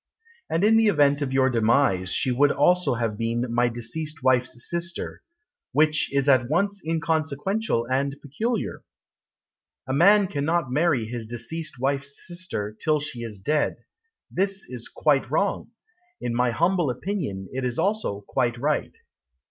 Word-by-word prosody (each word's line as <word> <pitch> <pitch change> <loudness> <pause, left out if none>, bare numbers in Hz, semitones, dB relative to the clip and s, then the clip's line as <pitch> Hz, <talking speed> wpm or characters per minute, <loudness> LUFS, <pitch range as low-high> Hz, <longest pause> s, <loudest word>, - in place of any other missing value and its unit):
And 165 +3 0
in 220 +2 +5
the 225 -1 +4
event 145 -6 +3
of 135 -2 -1
your 130 0 +3
demise 115 -5 +2
She 130 - +1
would 140 +3 +4
also 180 -7 +3
have 115 -2 -2
been 115 +1 -1
My 120 +1 +3
deceased 140 +6 -4
wife's 130 -1 +1
sister 170 0 -4 0.5
Which 155 +2 +2
is 140 0 +1
at 130 -3 +4
once 200 +5 +1
inconsequential 160 - -1
and 135 +3 0
peculiar. 220 - -3 1.0
A 130 - -1
man 200 +7 +6
cannot 160 -4 -1
marry 145 -4 +2
his 115 0 -6
deceased 150 +8 -5
wife's 140 +1 -2
sister 175 - -5
Till 155 -1 +2
she 145 -4 -6
is 110 -4 -6
dead. 150 +9 0 0.5
This 195 +1 -1
is 125 -2 -8
quite 140 -5 +1
wrong. 200 - 0 0.5
In 120 - -3
my 125 +1 +2
humble 170 +5 +1
opinion 125 - -3
It 130 0 -3
is 125 -1 -2
also 200 - -1
quite 120 +2 -1
right. 145 +4 -1
140 Hz, 150 wpm, -25 LUFS, 120-170 Hz, 1.0 s, man